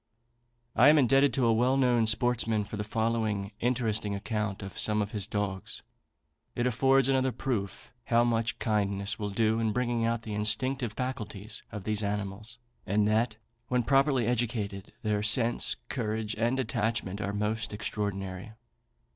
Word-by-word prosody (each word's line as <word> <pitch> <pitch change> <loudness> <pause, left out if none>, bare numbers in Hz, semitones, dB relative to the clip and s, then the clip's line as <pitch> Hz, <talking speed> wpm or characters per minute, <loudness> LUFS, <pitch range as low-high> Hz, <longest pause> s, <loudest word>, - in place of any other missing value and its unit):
[B] - - +1
I 130 - +9
am 155 - +6
indebted 135 +1 +4
to 130 - +2
a 115 - +4
well 125 +4 +3
known 120 -4 +3
sportsman 115 -1 +1
for 100 - -7
the 105 - -3
following 110 -2 -1
interesting 115 -4 0
account 105 -1 -3
of 95 - -7
some 105 0 +2
of 105 0 -1
his 105 -2 -3
dogs. 100 -4 -4 0.7
It 120 - 0
affords 135 +2 +3
another 130 -1 +2
proof 110 -7 -4
how 120 0 +3
much 115 0 0
kindness 100 -2 -1
will 105 -1 -2
do 110 +2 +1
in 110 -1 +1
bringing 120 -1 0
out 115 0 0
the 110 - -5
instinctive 120 +3 0
faculties 110 -4 -5
of 105 -3 -6
these 105 0 -1
animals; 105 +2 -3 0.3
and 105 +2 +1
that, 110 +1 +1 0.3
when 125 0 +1
properly 135 -1 +3
educated, 110 -5 -2
their 105 -1 +1
sense, 115 +3 +3
courage, 110 -3 -2
and 120 +4 +1
attachment 110 -4 -1
are 100 - -2
most 105 +1 -2
extraordinary. 100 -1 -4
110 Hz, 155 wpm, -29 LUFS, 105-120 Hz, 0.7 s, I